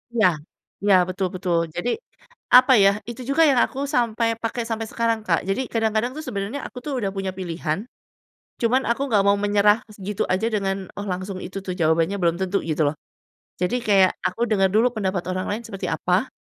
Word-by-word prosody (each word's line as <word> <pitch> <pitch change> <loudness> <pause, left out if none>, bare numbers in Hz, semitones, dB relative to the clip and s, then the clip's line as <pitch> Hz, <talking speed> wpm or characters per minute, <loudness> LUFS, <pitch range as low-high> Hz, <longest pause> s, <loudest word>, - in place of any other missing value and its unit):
Iya. 215 -4 +5 0.6
Iya 200 -1 +5
betul 185 +1 -1
betul, 180 -2 0 0.2
jadi, 210 +8 -1 0.7
apa 255 +1 +6
ya, 195 - +7 0.2
itu 240 +2 -7
juga 325 +4 +4
yang 260 - +4
aku 265 - -8 0.2
sampai 230 -1 +1 0.2
pakai 235 +1 -2
sampai 225 0 -3
sekarang, 230 -1 0
Kak. 165 -3 +2
Jadi, 195 +7 0
kadang-kadang 225 +1 +1
tuh 310 - -5
sebenernya 225 +4 -3
aku - - -15
tuh 295 - -3
udah 195 -3 -2
punya 195 -1 -2
pilihan. 170 -2 -2 0.8
Cuman 245 +3 +2
aku 235 +3 0
gak 200 - +5
mau 200 0 +5
menyerah 205 +1 +4 0.3
gitu 210 - -1
aja 190 +4 +1
dengan, 195 -2 0 0.2
"Oh 205 - -4
langsung 185 +1 -5
itu 190 - -6
tuh 185 - -2
jawabannya," 165 +4 +2
belum 170 0 +2
tentu 190 +1 0
gitu 155 0 +1
loh. 150 - -4 0.7
Jadi 180 +7 +1
kayak 190 -3 +5 0.2
aku 185 +6 -6
dengar 195 -2 +3
dulu 230 +3 +5
pendapat 190 -4 -1
orang 185 0 -2
lain 215 +3 -3
seperti 195 -3 -5
apa, - - +1
200 Hz, 190 wpm, -23 LUFS, 185-230 Hz, 0.8 s, ya